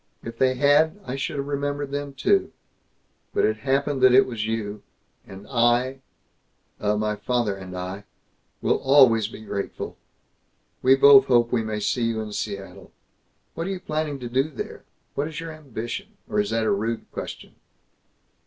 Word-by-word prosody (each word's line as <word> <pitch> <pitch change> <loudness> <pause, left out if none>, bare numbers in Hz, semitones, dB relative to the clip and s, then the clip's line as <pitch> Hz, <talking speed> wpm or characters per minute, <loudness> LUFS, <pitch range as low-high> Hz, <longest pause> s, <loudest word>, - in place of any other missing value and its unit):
If 115 0 -8
they 130 -1 +3
had, 145 +7 +3
I 130 0 -4
should 135 - -3
have 140 - -2
remembered 145 0 -3
them 145 -1 -4
too. 195 +8 +2 0.8
But - - +3
it 110 0 +1
happened 135 +3 0
that 130 -1 +7
it 135 - +7
was 110 -4 -4
you, 105 -2 -3 0.5
and 95 +1 -11
I, 125 +2 +2 0.8
uh, 105 0 +1
my 105 0 0
father 105 0 -1
and 95 -1 -8
I, 95 +3 -6 0.6
will - - +3
always 130 -6 +5
be 110 - -10
grateful. 100 -2 -5 0.8
We 130 +1 +6
both 135 0 +8
hope 120 -2 +3
we 120 - +2
may 110 -1 -3
see 105 +3 0
you 115 -1 -1
in 105 -1 -5
Seattle. 100 -2 -6 0.6
What 165 +2 -4
are - - -2
you 190 -1 -3
planning 155 -4 -2
to 120 - -4
do 130 +5 +1
there? 140 - -7 0.3
What 145 +2 -1
is 160 -1 -6
your 165 0 -6
ambition? 130 -7 -7
Or 105 - -1
is 105 0 +1
that 115 0 0
a - - +2
rude 110 +3 -1
question?" - - -8
125 Hz, 170 wpm, -24 LUFS, 110-140 Hz, 0.8 s, both